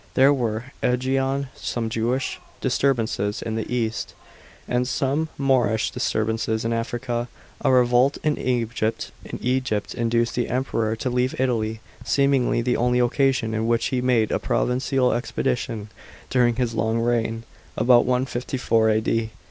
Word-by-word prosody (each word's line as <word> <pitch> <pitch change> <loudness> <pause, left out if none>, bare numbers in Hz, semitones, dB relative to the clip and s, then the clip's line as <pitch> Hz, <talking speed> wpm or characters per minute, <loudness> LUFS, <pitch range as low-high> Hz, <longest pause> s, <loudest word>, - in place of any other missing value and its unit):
There 135 +2 +6
were, 115 -3 -2 0.2
ajiain, 135 +2 0
some 115 -2 -3
Jewish 115 +4 -1 0.2
disturbances 120 -6 0
in 115 - -3
the 110 +1 -3
east, 115 -3 -2 0.5
and 125 0 0
some 140 +4 0
Moorish 125 -5 +2
disturbances 110 -2 -1
in 115 - 0
Africa. 120 +1 -2 0.4
A - - +4
revolt 125 +2 +4
in 150 -1 +2
Egypt 115 -3 -1 0.8
induced 115 0 0
the 120 - -1
Emperor 115 -3 -1
to 125 - -3
leave 125 +1 0
Italy, 110 -4 0 0.2
seemingly 140 -4 +2
the 125 +1 +1
only 125 +1 +2
occasion 125 -2 +2
on 110 +1 -1
which 115 0 +1
he 130 -2 0
made 120 -4 +2
a - - +1
provincial 130 0 +1
expedition 120 -2 -2 0.4
during 120 -2 +3
his 120 -1 -1
long 110 +1 0
reign 115 -1 0 0.3
(about 120 0 +5
154 125 -3 +1
A.D.). 110 +1 +1
120 Hz, 130 wpm, -23 LUFS, 115-130 Hz, 0.8 s, There